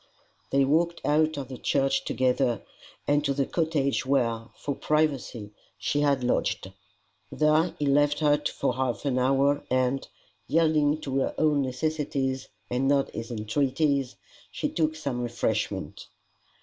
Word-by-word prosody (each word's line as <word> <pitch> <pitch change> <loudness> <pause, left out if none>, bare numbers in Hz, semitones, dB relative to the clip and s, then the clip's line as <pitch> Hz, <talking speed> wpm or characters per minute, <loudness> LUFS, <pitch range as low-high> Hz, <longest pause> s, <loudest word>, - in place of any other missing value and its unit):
They 135 0 +3
walked 170 +4 +1
out 155 +1 +2
of 140 -2 -4
the 130 -1 -8
church 135 -1 +1
together 130 -1 +1 0.4
and 145 0 +3
to 140 -2 0
the 140 -1 +1
cottage 155 -5 0
where, 120 -4 +1
for 145 - -3
privacy, 140 -9 -1 0.3
she 145 - -1
had 140 -3 +2
lodged. 125 - 0 0.6
There 155 +3 +2
he 150 - -1
left 145 +1 +3
her 150 -1 +3
for 135 - -1
half 125 -4 -2
an 130 -2 +1
hour, 135 +2 +2
and, 130 +1 +1 0.4
yielding 155 -2 +2
to 135 -2 -1
her - - -1
own 150 -2 +3
necessities 135 -1 -2 0.2
and 125 +4 0
not 140 -1 +2
his 115 +1 -6
entreaties, 135 +4 0 0.3
she - - -2
took 155 -1 0
some 140 -6 -3
refreshment. 120 -1 -2
140 Hz, 140 wpm, -27 LUFS, 130-150 Hz, 0.6 s, They